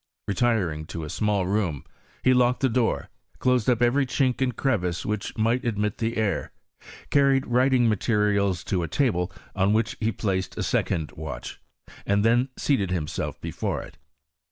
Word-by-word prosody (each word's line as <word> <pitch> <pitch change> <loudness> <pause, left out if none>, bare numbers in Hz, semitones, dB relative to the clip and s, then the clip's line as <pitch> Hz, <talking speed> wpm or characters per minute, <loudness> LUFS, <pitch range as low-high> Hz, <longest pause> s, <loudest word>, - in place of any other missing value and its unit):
Re 100 - 0
tiring 95 -11 0
to 80 - -5
a 75 - -6
small 105 -3 0
room, 90 -7 -1 0.4
he 130 - +5
locked 125 0 +3
the 135 - +3
door, 115 0 0 0.3
closed 125 -2 +2
up 120 -1 +3
every 135 +3 +3
chink 130 -1 0
and 125 -3 +1
crevice 90 -11 -1
which 105 -1 -3
might 115 +3 +1
admit 105 -3 -1
the 115 0 -1
air, 110 -3 -1 0.6
carried 140 -2 +4
writing 125 0 +3
materials 105 -3 +1
to 95 -3 -1
a 85 - -2
table, 100 - 0 0.2
on 100 +1 +2
which 110 +3 +1
he 115 0 +1
placed 95 -4 -2
a - - -1
second 80 -2 0
watch, 75 -4 -7 0.4
and 100 +1 +1
then 120 +3 +3
seated 115 -10 +1
himself 80 -4 -3
before - - -3
it. - - -14
110 Hz, 165 wpm, -25 LUFS, 95-125 Hz, 0.6 s, he